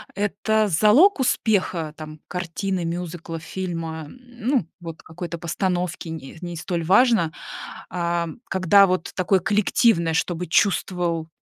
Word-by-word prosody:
это 210 +2 +1
залог 215 - +5
успеха 185 -10 0
там 155 -1 -9
картины, 180 +1 -3
мюзикла, 170 -1 -5
фильма, 165 -3 -5
ну 245 - -2
вот 165 -2 -8
какой-то 170 +1 -6
постановки, 175 0 -2
не 160 -1 -8
не 175 -1 -5
столь 170 0 -3
важно, 195 -2 +4 0.6
а 170 -1 -1 0.2
когда 190 +1 +5
вот 180 -2 -1
такое 185 +1 +2
коллективное, 200 -3 +2
чтобы 175 +2 -1
чувствовал 170 -2 +1
175 Hz, 115 wpm, -23 LUFS, 165-200 Hz, 0.6 s, залог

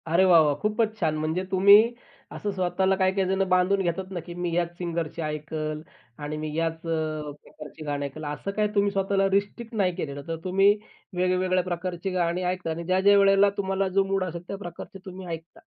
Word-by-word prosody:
अरे 170 +3 +4
वाह 175 -3 +7
वाह! 150 -2 +3
खूपच 215 +1 0
छान 160 -5 +1
म्हणजे 160 +4 -1
तुम्ही 200 +5 +7 0.4
असं 205 - -3
स्वतःला 190 0 +1
काही-काही 190 0 +1
जणं 190 0 +1
बांधून 185 +2 +3
घेतात 180 +1 -1
ना, 180 - -3
की 170 +1 -9
मी 175 -1 -3
याच 175 -1 +1
अ, - - -24
सिंगरची 170 -2 -3
ऐकल 155 0 -4 0.4
आणि 150 +1 -4
मी 155 0 -4
याच 165 0 0
अ, 155 -2 -2
प्रकारची 150 +1 -11
गाणी 145 -1 -2
ऐकल 140 +3 -7
असं 150 +7 -4
काय 210 +1 +1
तुम्ही 200 0 +3
स्वतःला 195 0 +1
रिस्ट्रिक्ट 205 +4 -1
नाही 185 -4 +1
केलेलं. 140 -5 -5
तर 165 - -2
तुम्ही 195 +2 +4 0.4
वेगवेगळ्या 185 0 +1
प्रकारची 180 +1 -3
गाणी 175 0 0
ऐकता 180 -1 -2
आणि 165 +1 -4
ज्या-ज्या 190 +3 +4
वेळेला 195 0 +5
तुम्हाला 195 0 0
जो 195 - +6
मूड 195 0 0
असेल 170 -2 -5
त्या 195 - -5
प्रकारचे 195 +1 -9
तुम्ही 190 0 -8
ऐकता. 165 0 -7
180 Hz, 195 wpm, -26 LUFS, 165-195 Hz, 0.4 s, वाह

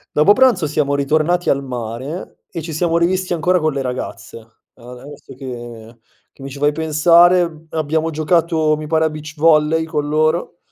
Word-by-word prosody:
Dopo 155 +8 +5
pranzo 250 -10 +3
siamo 145 -1 -1
ritornati 155 +5 0
al 140 0 +1
mare 125 - -6
e 165 - -5
ci 160 -1 -7
siamo 170 +1 +1
rivisti 185 +2 0
ancora 175 +2 +1
con 155 0 0
le 140 - -3
ragazze. 125 -2 -6 0.4
A 120 +1 -14
adesso 135 +4 -12
che 120 -3 -9 0.4
che 135 - -16
mi 135 - -6
ci 140 - -9
fai 145 +1 +2
pensare, 165 +1 +3
abbiamo 160 +1 -1
giocato, 160 0 +1
mi 155 - -6
pare 160 0 +1
a - - -2
beach 150 0 -9
volley 155 0 +3
con 150 -3 -3
loro. 155 +3 0
155 Hz, 175 wpm, -18 LUFS, 140-165 Hz, 0.4 s, Dopo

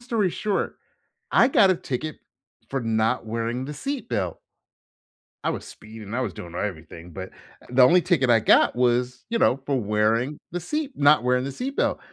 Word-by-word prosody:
story 230 -6 0
short, 205 +3 -2 0.6
I 240 - +5
got 205 -7 +5
a - - +2
ticket 155 0 -5 0.5
for 135 -1 -2
not 115 +1 0
wearing 115 +3 -3
the 150 - -6
seat 270 - -5
belt. 95 -8 -2 1.1
I - - +1
was - - -5
speeding, 110 -1 -10
I 125 - 0
was 120 -7 -2
doing 85 0 -10
everything, 85 -3 -6
but 95 +1 -7 0.4
the 125 +1 +4
only 175 +8 +6
ticket 145 -8 +2
I 115 - +6
got 110 - +4
was, 125 0 +1
you 230 - 0
know, 130 - +4
for 135 -1 -2
wearing 110 +6 0
the 175 - -3
seat 295 - -3
not 145 -2 +5
wearing 125 +1 +2
the 140 - -4
seat 270 - -5
belt. - - +1
125 Hz, 185 wpm, -24 LUFS, 110-165 Hz, 1.1 s, only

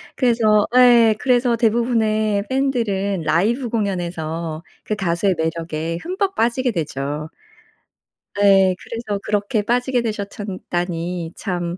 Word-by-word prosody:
그래서 225 -4 +3
예 240 -3 +6
그래서 245 -2 +2
대부분의 220 -3 +1
팬 270 +1 +1
들은 200 -6 -1
라이브 215 - +1
공연에서 170 -6 -3 0.2
그 215 - -2
가수의 185 -1 0
매력에 160 0 -3
흠뻑 380 +2 -2
빠지게 240 +2 +1
되죠. 150 -3 -4 1.1
네 195 -2 +4
그래서 220 -4 -4
그렇게 210 +1 0
빠지게 245 +3 +1
되셨 210 -3 -3
참 200 -2 -6
다니 175 -1 -3
참 175 -1 -3
205 Hz, 260 characters per minute, -20 LUFS, 175-235 Hz, 1.1 s, 예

